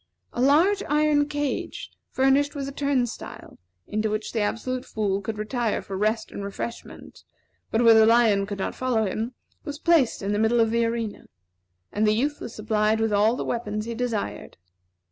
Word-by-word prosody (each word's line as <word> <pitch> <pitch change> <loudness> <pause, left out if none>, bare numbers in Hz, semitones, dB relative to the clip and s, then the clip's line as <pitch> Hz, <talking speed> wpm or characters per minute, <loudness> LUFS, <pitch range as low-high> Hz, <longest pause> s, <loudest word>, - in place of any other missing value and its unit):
A 240 - -2
large 335 +10 +4
iron 295 -1 +2
cage, 290 -2 -3 0.2
furnished 275 +3 +2
with 275 -1 -3
a - - -5
turnstile, 275 -4 -3 0.3
into 215 +1 -1
which 215 0 -3
the 230 - -1
Absolute 250 +4 -2
Fool 200 -2 -2
could 215 +2 -5
retire 225 +1 -1
for 195 - -6
rest 215 +3 -1
and 200 - -6
refreshment, 200 +4 -7 0.5
but 225 +2 +1
where 230 -1 +8
the 220 0 +6
lion 225 -4 +4
could 200 -1 -5
not 190 - -3
follow 245 -4 0
him, 225 +5 -3 0.3
was 290 0 -6
placed 315 -10 +2
in 200 +1 -1
the 205 - 0
middle 225 +2 +3
of 225 -1 +3
the 235 0 +2
arena, 230 -2 -3 0.7
and 215 +1 +1
the 210 - +3
youth 290 +6 -1
was 235 - -7
supplied 215 0 +1
with 225 -1 +1
all 210 +3 +3
the - - -4
weapons 215 -3 -3
he 235 - -4
desired. 225 - -4
230 Hz, 185 wpm, -25 LUFS, 215-260 Hz, 0.7 s, where